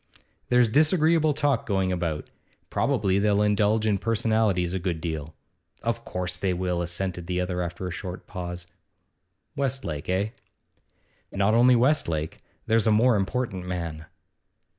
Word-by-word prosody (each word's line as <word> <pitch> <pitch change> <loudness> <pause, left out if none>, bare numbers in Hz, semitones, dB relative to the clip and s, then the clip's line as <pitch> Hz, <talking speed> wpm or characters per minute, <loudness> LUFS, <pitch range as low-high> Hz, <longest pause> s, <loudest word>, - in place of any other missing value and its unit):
'There's 125 -1 +5
disagreeable 155 - +3
talk 145 -4 0
going 95 -3 +1
about. 85 -4 -2 0.4
Probably 100 -8 +1
they'll 105 0 +3
indulge 105 +1 +2
in 105 -3 +2
personalities 110 -5 +1
a 95 - -1
good 85 -2 -2
deal.' 80 -2 -5 0.5
'Of 115 0 -1
course 90 0 -3
they 95 -1 0
will,' 90 -1 -1
assented 85 0 -4
the 90 0 -1
other 90 0 -1
after 85 +1 -4
a - - -4
short 90 0 -6
pause. 90 -2 -6 0.9
'Westlake, 130 - -3
eh?' 95 +3 +1 1.0
'Not 100 +2 +2
only 125 +2 +6
Westlake. 115 - +1 0.3
There's 115 0 +2
a - - +5
more 115 +3 +4
important 100 -2 -2
man. 85 -3 -4
95 Hz, 140 wpm, -26 LUFS, 90-115 Hz, 1.0 s, only